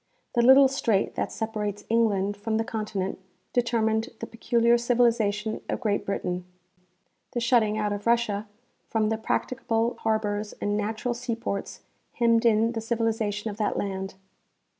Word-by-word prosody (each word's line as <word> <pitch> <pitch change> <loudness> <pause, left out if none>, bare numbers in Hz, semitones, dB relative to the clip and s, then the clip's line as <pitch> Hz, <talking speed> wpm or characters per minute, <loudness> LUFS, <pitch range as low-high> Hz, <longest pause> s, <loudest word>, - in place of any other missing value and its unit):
The 240 - +3
little 265 +3 +8
strait 235 -7 0
that - - -2
separates 210 -2 -3
England 205 -3 +2
from 220 +2 -2
the 225 - +1
continent 210 -4 -3 0.3
determined 225 -1 +1
the - - -4
peculiar 235 +1 +2
civilization 230 -3 +1
of - - -1
Great 210 -4 -1
Britain. 180 -2 -2 0.9
The 240 - 0
shutting 230 -3 +3
out 210 -1 0
of 205 +2 -5
Russia 220 -3 +1 0.4
from 215 -1 +1
the 220 - 0
practicable 230 0 -1
harbors 215 -1 -1
and 205 0 -2
natural 215 +3 -1
seaports, 230 -4 -4 0.3
hemmed 230 -1 +3
in 225 +1 +3
the 225 -2 -3
civilization 225 -2 -1
of 205 - -9
that 210 -2 0
land. 190 -1 -3
220 Hz, 140 wpm, -26 LUFS, 210-235 Hz, 0.9 s, little